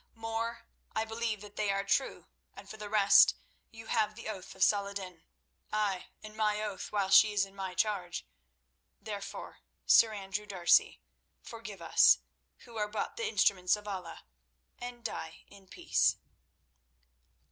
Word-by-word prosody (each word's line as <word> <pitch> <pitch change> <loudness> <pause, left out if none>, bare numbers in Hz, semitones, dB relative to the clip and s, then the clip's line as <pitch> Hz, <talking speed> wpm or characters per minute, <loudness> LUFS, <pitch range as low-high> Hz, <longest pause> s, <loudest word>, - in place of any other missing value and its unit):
"More, 225 +1 -4 0.3
I 220 - 0
believe 225 -2 -3
that 205 -1 -13
they 210 - 0
are 195 0 0
true, 200 +7 -1 0.3
and - - -12
for 220 - -9
the 210 -1 -7
rest 205 -2 +6 0.3
you 225 0 -12
have 215 -2 0
the 225 0 -7
oath 195 -4 -8
of 190 - +1
Salah 200 -1 +3
ed 200 - -10
din—ay, 190 +2 -5 0.2
and 215 0 -10
my 210 -1 +1
oath 210 -3 -5
while 200 -2 0
she 210 +2 +7
is 200 -1 +2
in 195 - -17
my 190 -2 -5
charge. 185 -5 -1 0.7
Therefore, 205 -2 -7 0.3
Sir 225 - +6
Andrew 205 0 -5
D'Arcy, 180 -4 +3 0.4
forgive 210 -6 -9
us, - - +6 0.5
who 235 -2 -11
are 210 -1 0
but 210 0 -4
the 455 -2 -2
instruments 185 - +2
of 210 0 -12
Allah, 185 -4 -6 0.6
and 245 -1 -8
die 160 -7 -6
in 195 -1 -17
peace." - - +1
210 Hz, 155 wpm, -31 LUFS, 195-220 Hz, 0.7 s, she